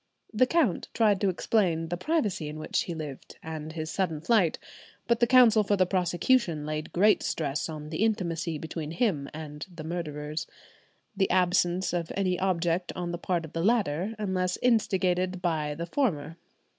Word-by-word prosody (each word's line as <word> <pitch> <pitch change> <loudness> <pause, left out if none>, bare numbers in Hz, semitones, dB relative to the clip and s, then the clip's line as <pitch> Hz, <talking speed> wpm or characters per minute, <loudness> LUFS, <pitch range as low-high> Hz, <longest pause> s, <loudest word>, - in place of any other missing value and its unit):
The 250 +4 +4
count 295 - +1
tried 210 -4 +3
to 200 - +3
explain 175 -4 +1
the 175 - -1
privacy 210 - -1
in 150 - -7
which 155 - -1
he 170 - -4
lived, 150 -4 -7
and 160 -1 -6
his 155 -1 -4
sudden 180 -6 -1
flight. 180 -1 +2 0.5
But 235 -1 +2
the 240 - +4
counsel 240 -4 +6
for 205 0 +2
the 185 -2 +3
prosecution 180 -1 +1
laid 155 0 -4
great 205 +4 +4
stress 150 0 -2
on 150 -1 -7
the 165 +6 0
intimacy 170 -7 -1
between 160 0 -5
him 165 - 0
and 150 -1 -7
the 170 -3 -8
murderers; 155 -2 -4 0.7
the 195 -1 +1
absence 180 0 +2
of 170 -2 -2
any 185 -2 0
object 175 -1 0
on 175 -2 -3
the 175 - -4
part 175 -2 -1
of 155 - -13
the 165 - -2
latter, 205 -2 +1
unless 185 -3 -1
instigated 185 -6 +2
by 155 -4 -1
the 170 +2 -4
former. 165 - -1
175 Hz, 170 wpm, -28 LUFS, 160-200 Hz, 0.7 s, counsel